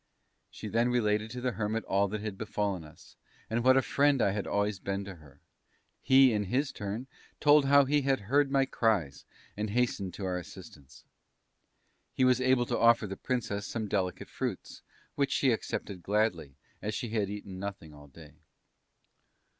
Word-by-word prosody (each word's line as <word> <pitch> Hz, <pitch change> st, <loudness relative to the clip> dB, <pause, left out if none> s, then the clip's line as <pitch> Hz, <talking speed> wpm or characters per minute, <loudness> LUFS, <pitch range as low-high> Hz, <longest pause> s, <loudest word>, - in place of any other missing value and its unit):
She -, -, -8 dB
then 115 Hz, +2 st, +1 dB
related 105 Hz, -3 st, +1 dB
to 125 Hz, +2 st, -6 dB
the 125 Hz, 0 st, 0 dB
Hermit 110 Hz, 0 st, -2 dB
all 100 Hz, +1 st, +1 dB
that 105 Hz, +1 st, -4 dB
had 105 Hz, -2 st, -4 dB
befallen 100 Hz, -3 st, -2 dB
us, 75 Hz, -, -16 dB, 0.4 s
and 115 Hz, +1 st, 0 dB
what 130 Hz, +1 st, +6 dB
a 135 Hz, -, +3 dB
friend 140 Hz, -1 st, +2 dB
I 100 Hz, -, +3 dB
had 100 Hz, 0 st, -3 dB
always 100 Hz, -1 st, 0 dB
been 100 Hz, +1 st, -3 dB
to 100 Hz, -3 st, -9 dB
her. 70 Hz, -3 st, -19 dB, 0.6 s
He 130 Hz, -2 st, +6 dB
in 105 Hz, -1 st, 0 dB
his 135 Hz, +8 st, 0 dB
turn 105 Hz, +5 st, -5 dB, 0.3 s
told 145 Hz, -1 st, +5 dB
how 140 Hz, 0 st, +6 dB
he 145 Hz, +2 st, +2 dB
had 135 Hz, -2 st, +1 dB
heard 140 Hz, +7 st, +2 dB
my 135 Hz, -1 st, +2 dB
cries 105 Hz, -, 0 dB, 0.3 s
and 105 Hz, +1 st, -3 dB
hastened 100 Hz, -5 st, -1 dB
to 100 Hz, -, -5 dB
our 90 Hz, -1 st, -1 dB
assistance. 70 Hz, -5 st, -13 dB, 1.1 s
He 130 Hz, -, +3 dB
was 130 Hz, 0 st, +3 dB
able 130 Hz, -1 st, +3 dB
to -, -, -2 dB
offer 115 Hz, -1 st, +5 dB
the 95 Hz, -1 st, -5 dB
Princess 105 Hz, -4 st, -3 dB
some 110 Hz, -2 st, -3 dB
delicate 95 Hz, -3 st, -2 dB
fruits, -, -, -5 dB, 0.3 s
which 140 Hz, -1 st, 0 dB
she 135 Hz, -, +2 dB
accepted 100 Hz, -4 st, -4 dB
gladly, 90 Hz, -9 st, -1 dB, 0.3 s
as 105 Hz, +1 st, -3 dB
she 120 Hz, -1 st, -4 dB
had 105 Hz, -3 st, -1 dB
eaten 100 Hz, -2 st, -7 dB
nothing 95 Hz, -6 st, -7 dB
all 75 Hz, 0 st, -14 dB
day. 75 Hz, +1 st, -15 dB
105 Hz, 180 wpm, -30 LUFS, 95-125 Hz, 1.1 s, what